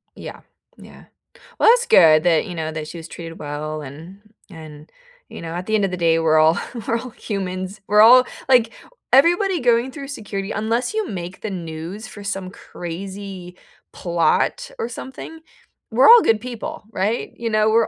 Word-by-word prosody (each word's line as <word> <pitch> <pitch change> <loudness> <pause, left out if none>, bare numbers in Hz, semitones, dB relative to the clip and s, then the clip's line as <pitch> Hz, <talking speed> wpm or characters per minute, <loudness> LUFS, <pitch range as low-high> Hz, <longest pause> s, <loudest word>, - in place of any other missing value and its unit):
Yeah. - - -10 0.4
Yeah. - - -15 0.5
Well, - - +6
that's 485 +1 +4
good 155 -1 +6
that, 170 0 +2
you 180 -4 -7
know 160 -1 -3
that 155 -1 -6
she 170 - -9
was 165 - -9
treated 165 0 -9
well 150 +1 -5
and 160 +8 -11 0.3
and, 155 -2 -12 0.4
you - - -9
know, 165 0 -6
at 180 - -5
the 220 - -4
end 205 -2 +2
of 185 - -3
the 180 - -4
day, 165 -1 +2
we're 155 -1 +3
all 160 +2 +4 0.3
we're 230 - +1
all 255 - -8
humans. 190 -1 -5
We're 210 +1 +5
all, 250 +3 +8 0.2
like 245 -4 +4 0.4
everybody 350 +6 +4
going 245 +1 +2
through 275 -1 -9
security, 200 -7 -5
unless 230 - -1
you 435 -2 -2
make 180 -1 -7
the 220 - -4
news 175 +4 -7
for 205 -2 -11
some 195 -2 -4
crazy 185 0 -8 0.4
plot 175 - 0
or 460 0 -3
something, 295 +5 -9 0.5
we're 245 +4 +5
all 475 0 +10
good 220 - +2
people, 240 -3 -7
right? 210 +4 -2
You 230 -1 -3
know, 215 0 +2
we're 225 +1 +3
195 Hz, 180 wpm, -21 LUFS, 165-230 Hz, 0.5 s, all